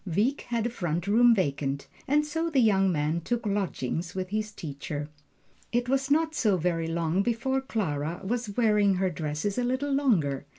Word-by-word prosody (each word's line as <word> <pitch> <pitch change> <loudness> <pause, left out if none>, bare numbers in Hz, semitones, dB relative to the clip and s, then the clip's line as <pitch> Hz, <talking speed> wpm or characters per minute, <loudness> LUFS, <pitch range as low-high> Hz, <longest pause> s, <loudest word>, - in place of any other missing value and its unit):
Wieck 210 - 0
had 235 -2 -1
a 240 - -1
front 175 -6 -2
room 230 +3 +5
vacant, 140 -6 -1 0.2
and 295 +2 +3
so 325 +3 -2
the 290 -5 +2
young 195 -5 +4
man 155 +1 0
took 235 +6 -2
lodgings 180 -4 -2
with 185 -1 -3
his 215 +1 -2
teacher. 145 -4 -6 0.6
It 240 +1 0
was 270 +1 0
not 320 +2 +2
so 215 -10 +2
very 165 -1 0
long 165 +2 0
before 240 +4 0
Clara 170 - -2
was 220 0 -3
wearing 210 -4 +4
her 185 0 0
dresses 155 +7 -2
a - - +1
little 260 +4 -1
longer. 165 - +1
200 Hz, 175 wpm, -27 LUFS, 165-245 Hz, 0.6 s, room